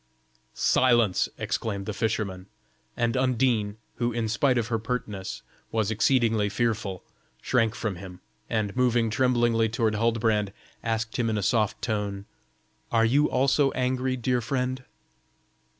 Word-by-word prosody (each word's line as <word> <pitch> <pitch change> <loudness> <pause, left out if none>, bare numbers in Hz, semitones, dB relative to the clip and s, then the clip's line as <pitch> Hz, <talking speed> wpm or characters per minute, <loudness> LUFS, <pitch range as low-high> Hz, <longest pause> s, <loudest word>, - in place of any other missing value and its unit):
"Silence!" 120 -7 +3
exclaimed 100 -3 -3
the 105 - -3
fisherman, 100 -4 -2 0.5
and 120 0 +1
Undine, 125 -5 +1 0.2
who, 120 0 0
in 115 -1 -1
spite 125 +4 +2
of 120 - +1
her 115 -2 0
pertness, 110 -4 -4 0.3
was 110 -1 0
exceedingly 115 -2 +2
fearful, 105 -4 -1 0.4
shrank 115 -3 +1
from 105 -5 -3
him, 90 -1 -10 0.3
and 105 -3 -1
moving 120 -3 +2
tremblingly 120 -2 +2
toward 110 -1 0
Huldbrand, 110 -2 +1 0.3
asked 115 -1 -2
him 115 -2 +1
in 110 - 0
a 105 - -1
soft 110 +1 +1
tone: 105 -3 -2 0.7
"Are 115 -1 +4
you 145 +6 +3
also 135 +2 +3
angry, 130 0 0
dear 125 0 0
friend?" 130 +1 -2
115 Hz, 135 wpm, -26 LUFS, 105-125 Hz, 0.7 s, Are